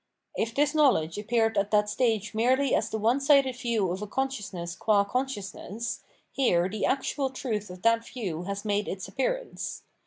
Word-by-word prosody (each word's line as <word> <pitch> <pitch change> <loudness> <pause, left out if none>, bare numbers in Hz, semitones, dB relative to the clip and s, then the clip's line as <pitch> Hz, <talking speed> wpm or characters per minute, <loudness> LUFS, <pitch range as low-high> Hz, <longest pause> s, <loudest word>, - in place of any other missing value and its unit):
If 225 +1 -2
this 295 +1 +2
knowledge 240 - +3
appeared 225 0 +1
at 200 +1 0
that 210 -1 +3
stage 215 -2 0
merely 255 +4 +2
as 220 - +1
the 220 - -2
one 230 +5 +2
sided 275 -2 +4
view 230 -7 0
of 185 +3 -4
a 210 - -4
consciousness 205 -9 -3
qua 205 -1 +3
consciousness, 230 -2 -4 0.3
here 180 -10 +2
the 205 +2 -1
actual 275 0 0
truth 225 -6 -3
of 180 0 -10
that 230 0 +4
view 190 -10 -4
has 200 +2 -4
made 205 0 0
its 190 0 -4
appearance. - - -3
225 Hz, 175 wpm, -28 LUFS, 200-260 Hz, 0.3 s, sided